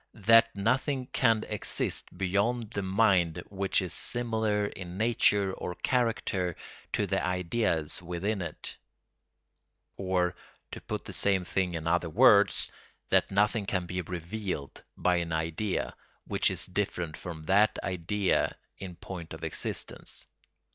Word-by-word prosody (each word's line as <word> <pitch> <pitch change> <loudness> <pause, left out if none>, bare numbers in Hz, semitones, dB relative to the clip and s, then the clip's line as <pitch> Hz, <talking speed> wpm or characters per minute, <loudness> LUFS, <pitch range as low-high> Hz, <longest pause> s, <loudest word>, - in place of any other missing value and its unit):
that 115 +1 +7
nothing 130 +6 +1
can 115 -3 +2
exist 105 -1 0
beyond 100 +5 0
the 100 - -2
mind 95 -4 +3
which 95 0 +1
is 90 - -3
similar 110 -3 +1
in 90 -3 -7
nature 105 -3 +3
or 90 - -5
character 95 -5 0 0.4
to - - +1
the - - 0
"ideas" 90 -3 0
within 90 +4 -2
it; 85 -3 -5 1.2
or, 90 -2 +1 0.4
to - - -7
put - - -5
the - - -6
same 95 -3 +2
thing 90 -1 -1
in 80 -1 -4
other 85 0 +1
words, 75 - +5 0.4
that - - +3
nothing 105 +1 +2
can 95 -3 0
be 90 +1 -3
revealed 90 -2 -5 0.2
by 90 -1 +2
an 85 -1 -2
idea 80 +5 -1 0.3
which - - +2
is - - -2
different 90 -4 -2
from 80 -3 -7
that 100 +5 +3
idea 95 +2 0 0.2
in 90 -2 -7
point 85 -2 -8
of - - -12
existence. - - -4
95 Hz, 135 wpm, -29 LUFS, 90-105 Hz, 1.2 s, that